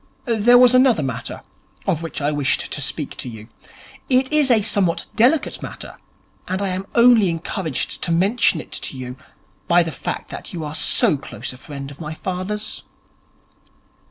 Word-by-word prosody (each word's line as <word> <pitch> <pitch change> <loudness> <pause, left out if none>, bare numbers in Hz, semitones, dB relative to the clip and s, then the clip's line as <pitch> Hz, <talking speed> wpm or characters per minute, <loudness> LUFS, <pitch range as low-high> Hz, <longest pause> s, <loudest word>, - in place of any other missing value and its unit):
There 240 0 +5
was 250 0 +7
another 255 - +5
matter 130 -4 -5 0.4
of 165 - 0
which 165 -2 -5
I 145 +1 +1
wished 145 -2 0
to 145 - -2
speak 145 +1 -2
to 125 - -4
you. 110 -2 -10 0.6
It 260 +2 +2
is 300 -3 +4
a 225 -4 +5
somewhat 200 -5 0
delicate 260 +7 +2
matter, - - -8 0.5
and 185 +1 -2
I 200 -1 -1
am 185 +1 -4
only 235 -5 +6
encouraged 165 - -3
to 170 - -1
mention 190 +1 +3
it - - -10
to 135 - -4
you 125 -1 -6 0.5
by 175 0 +5
the 165 - -4
fact - - -5
that - - -7
you 165 -3 -4
are 150 -1 -5
so 155 - +2
close 130 -2 -7
a - - -12
friend 140 -1 -8
of 140 - -12
my 155 0 -5
father's.' 190 +5 -3
180 Hz, 175 wpm, -21 LUFS, 150-225 Hz, 0.6 s, was